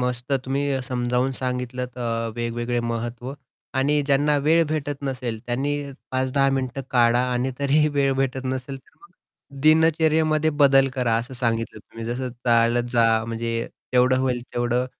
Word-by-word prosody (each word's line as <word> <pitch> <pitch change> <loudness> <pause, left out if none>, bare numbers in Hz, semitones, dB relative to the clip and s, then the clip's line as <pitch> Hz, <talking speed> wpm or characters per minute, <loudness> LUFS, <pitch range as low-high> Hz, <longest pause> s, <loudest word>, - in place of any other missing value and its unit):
मस्त 125 +1 -2
तुम्ही 135 0 -1
समजावून 125 0 0
सांगितलत 125 -1 -4
अ, 115 -1 -2
वेगवेगळे 120 +1 -2
महत्त्व 120 +2 -4 0.4
आणि 145 +3 +2
ज्यांना 145 +1 +3
वेळ 165 +2 +5
भेटत 145 -2 -3
नसेल 125 -4 -3
त्यांनी 130 +4 -1 0.4
5-10 130 +1 +1
मिनिटं 130 0 -2
काढा 120 -1 +4
आणि 125 +2 0
तरीही 145 +2 +3
वेळ 140 -1 +2
भेटत 135 0 -1
नसेल 130 +1 -3
तर - - -28
मग 400 - -17 0.5
दिनचर्येमध्ये 155 0 +3
बदल 135 -1 +5
करा 125 -4 +1
असं 120 +3 -4
सांगितलं 115 -3 -2
तुम्ही 115 +2 -10
जसं 125 +2 -3 0.2
चालत 120 0 +3
जा, 115 -2 +3
म्हणजे 115 0 -3 0.3
तेवढं 125 +1 +4
होईल 125 -2 0
तेवढं 120 +1 0
125 Hz, 145 wpm, -23 LUFS, 120-135 Hz, 0.5 s, वेळ